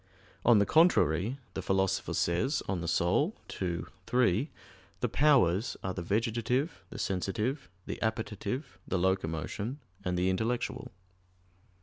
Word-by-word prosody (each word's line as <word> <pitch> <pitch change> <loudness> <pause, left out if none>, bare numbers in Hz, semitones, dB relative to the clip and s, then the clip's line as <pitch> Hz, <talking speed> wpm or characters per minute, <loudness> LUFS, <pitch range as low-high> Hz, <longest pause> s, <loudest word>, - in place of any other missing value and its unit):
On 120 - +6
the 100 - +4
contrary, 120 - +4 0.2
The - - -3
Philosopher 95 0 0
says 90 - +1
(De - - -1
Anima 85 - +1 0.3
ii, 90 -2 0 0.3
3), 125 - +2 0.5
"The - - 0
powers 125 - +3
are 95 - -2
the 90 - -4
vegetative, 115 - 0
the - - -8
sensitive, 100 +5 -2 0.2
the - - -5
appetitive, 110 +5 -3
the 95 - 0
locomotion, 95 - -1 0.2
and 90 -1 -1
the 90 +1 +2
intellectual." 120 +5 -2
100 Hz, 120 wpm, -31 LUFS, 90-125 Hz, 0.5 s, On